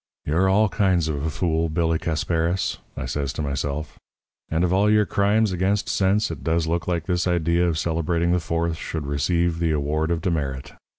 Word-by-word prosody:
'You're 85 +6 +2
all 105 +3 +4
kinds 95 -6 +1
of 75 -2 -2
a 80 - 0
fool, 80 +1 0
Billy 80 0 +1
Casparis,' 85 +3 -1 0.2
I - - -3
says 70 -2 -2
to 75 - -3
myself; 70 +2 -3 0.5
'and 80 +2 0
of 90 0 +1
all 100 +2 +3
your 105 0 +4
crimes 105 +1 +2
against 95 +3 0
sense 100 +3 +1
it - - -7
does 80 0 +1
look 85 +1 -2
like 85 -3 -1
this 90 0 0
idea 85 0 +2
of 80 -2 0
celebrating 85 +1 0
the 90 - +3
Fourth 85 0 -1
should 80 -2 -5
receive 85 +4 0
the 85 -1 +1
award 75 +1 0
of 85 -1 0
demerit. 70 -7 -2
85 Hz, 190 wpm, -23 LUFS, 80-90 Hz, 0.5 s, all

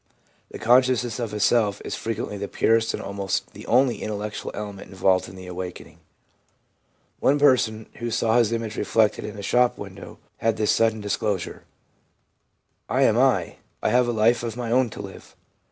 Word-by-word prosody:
The - - -8
con 120 +4 +5
sciousness 125 -2 -1
of 115 -3 -3
a 105 - -4
self 105 0 +2
is - - -4
frequently 115 -2 -4
the 100 0 -4
purest 115 +2 +2
and - - -7
almost 100 -1 -3
the 105 - -11
only 125 0 +3
intellectual 105 0 -4
element 100 -2 -7
involved 95 -1 +1
in 95 - -12
the 95 0 -10
awakening. 90 0 -7 1.2
One 140 - +3
person, 125 -6 +3
who 120 -1 -3
saw 115 +1 +2
his 115 -2 +2
image 115 -2 -3
reflected 105 +1 +1
in 105 - -7
a 100 - -7
shop 125 +3 +2
window, - - -9 0.2
had 115 -1 0
this 105 - +2
sudden 110 -1 +2
disclosure: 100 -2 -2 0.6
' - - -48
I - - +5
am 110 - +4
I. 120 -8 +2 0.3
I - - +2
have 125 0 +3
a - - +1
life 115 +1 +3
of 115 -1 -5
my 120 -2 -3
own 125 0 +3
to - - -8
live.' - - -12
110 Hz, 185 wpm, -24 LUFS, 100-120 Hz, 1.2 s, con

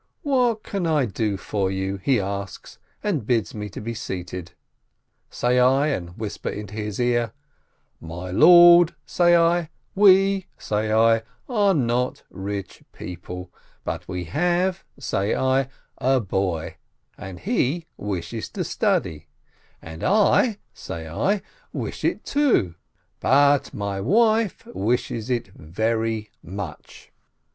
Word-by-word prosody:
"What 250 -6 +1
can 195 -4 -2
I 150 -4 +2
do 105 -1 -2
for 95 +1 -2
you 95 +1 -2
?" - - -25
he 130 -4 +3
asks, 100 -1 -6 0.2
and 180 - 0
bids 120 -3 +1
me 105 -1 -5
be 110 +4 -6
seated. 90 -4 -6 0.8
Say 125 +1 +1
I, 135 +4 +4
and 90 -9 -4
whisper 110 -2 -4
into 105 0 -7
his 105 0 -4
ear, 120 -1 +1 0.7
"My 85 +3 -7
lord," 175 - +8
say 175 -1 +4
I, 170 -1 +3 0.2
"we," 195 -1 +5
say 110 +1 -2
I, 115 +1 +4 0.3
"are 205 -6 +2
not 125 -2 0
rich 100 0 -6
people, 90 0 -8 0.3
but - - -5
we 90 -1 -4
have," 175 - 0
say 105 -6 -1
I, 130 0 +1 0.3
"a 130 +1 +3
boy, 95 -6 -2 0.4
and 95 -2 -9
he 170 - 0
wishes 100 +1 -4
to - - -2
study, 75 -2 -1 0.6
and 80 0 -9
I," 210 +2 +3 0.2
say 80 -1 -7
I, 190 - 0 0.3
"wish - - -5
it, - - -1
too, 275 - +2 0.5
but 145 +1 +3
my 100 -1 -3
wife 220 - +2
wishes 115 +3 -2
it 120 -5 -1
very 110 +6 -2
niuch 95 -4 -8
115 Hz, 125 wpm, -23 LUFS, -, 0.8 s, lord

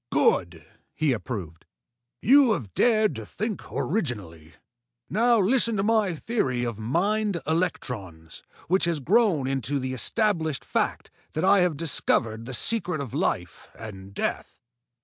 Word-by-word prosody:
"Good!" 85 -3 +1 0.3
he 155 -4 +2
approved. 100 -9 -6 0.6
"You 265 -1 +6
have 105 - -5
dared 215 - +3
to - - -6
think 215 -1 -4
originally. 95 - -3 0.6
Now 235 +3 +4
listen 230 +2 +3
to 195 - +1
my 215 -5 +2
theory 135 - -1
of 115 -3 -3
mind 195 - 0
electrons 115 - -3 0.3
which 185 +3 +2
has 170 -3 0
grown 185 - +2
into 135 +1 -1
the 130 -1 -3
established 160 - 0
fact - - -2 0.2
that 155 - 0
I 200 +1 +6
have 180 -5 +1
discovered 115 -8 +1
the 130 - -7
secret 180 - -1
of 135 -5 -6
life - - -2
and 100 -3 -9
death." - - -4
155 Hz, 135 wpm, -26 LUFS, -, 0.6 s, You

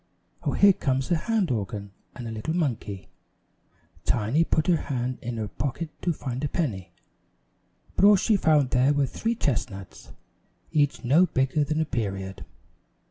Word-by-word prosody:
"Oh, - - -1
here 200 -1 +6
comes 135 -2 -1
a - - +5
hand 205 - 0
organ 105 -3 -3 0.2
and 120 - -6
a - - -5
little 110 +9 -3
monkey!" 115 - -2 0.9
Tiny 120 +8 +2
put 160 -1 +1
her 175 -2 +4
hand 125 -1 -2
in 120 -1 -4
her 110 -1 -2
pocket 140 +8 -4
to 175 - +1
find 130 -4 -4
a - - +1
penny, 110 - -2 1.0
but - - +4
all 205 0 +8
she 210 +3 +2
found 150 -8 +3
there 130 +3 +4
were 145 -1 +2
three 225 - -2
chestnuts, 110 - -3 0.6
each 145 -2 +1
no 155 +9 +5
bigger 135 0 +1
than 155 +2 -1
a 160 - +2
period. 100 -8 -4
135 Hz, 160 wpm, -26 LUFS, 115-160 Hz, 1.0 s, all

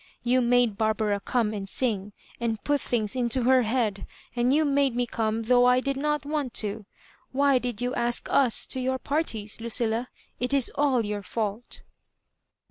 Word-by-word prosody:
You 250 +1 +3
made 240 -3 +2
Barbara 215 -2 +1
come 220 0 0
and 195 -2 -5
sing, 210 -5 -2 0.3
and 225 -2 -2
put 290 -2 +1
things 220 -2 -1
into 245 0 +1
her 260 +1 +5
head; 220 -3 -1 0.3
and 240 +1 +2
you 305 +3 +3
made 280 -3 +2
me 245 0 +1
come, 225 -1 -2
tliough 245 +2 +4
I 250 0 +4
did 275 +1 -2
not 300 +1 -1
want 290 -4 -2
ta 210 -1 -1 0.5
Why 275 0 +3
did 245 -1 -4
you 250 +1 -1
ask 240 -2 -1
us 255 -5 +3
to 260 - -4
your 260 +1 0
parties, 240 -7 -2
Luoilla? 230 +1 0 0.3
It 250 +3 0
is 270 -3 +2
all 265 -6 +2
your 205 -1 -4
&ult 215 +2 -3
245 Hz, 175 wpm, -26 LUFS, 220-260 Hz, 0.5 s, her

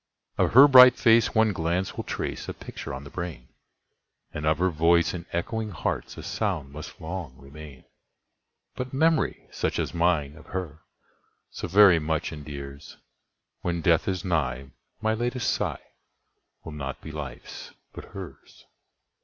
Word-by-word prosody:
Of - - +1
her 135 +4 +10
bright 125 -2 +9
face 115 -1 +4
one 110 -1 +4
glance 85 +2 -1
will - - -4
trace - - -4
a - - -5
picture - - -8
on 65 0 -6
the 70 - -11
brain, 85 -9 -6 0.8
And 75 0 -3
of 80 -1 +3
her 90 +2 +1
voice 85 +2 +3
in 85 -1 -7
echoing 110 +6 -2
hearts 90 - -4
a - - -8
sound 70 0 -2
must 75 +1 -9
long 80 -5 -6
remain; 70 -1 -12 0.9
But 125 0 -6
memory 160 +3 +1
such - - -2
as - - -2
mine 85 -4 +1
of 75 - -15
her 85 -4 -5 0.7
so - - -5
very 95 -2 +6
much 80 +1 -2
endears, 70 -2 -9 0.6
When 85 -1 -2
death 80 0 +3
is 95 0 -2
nigh 70 -7 -1 0.3
my 110 0 +1
latest 120 +2 -1
sigh - - -3 0.8
will 80 - -8
not 70 -2 -6
be 80 - -8
life's 75 -4 -8 0.2
but - - -9
hers. - - -11
85 Hz, 155 wpm, -26 LUFS, 75-100 Hz, 0.9 s, her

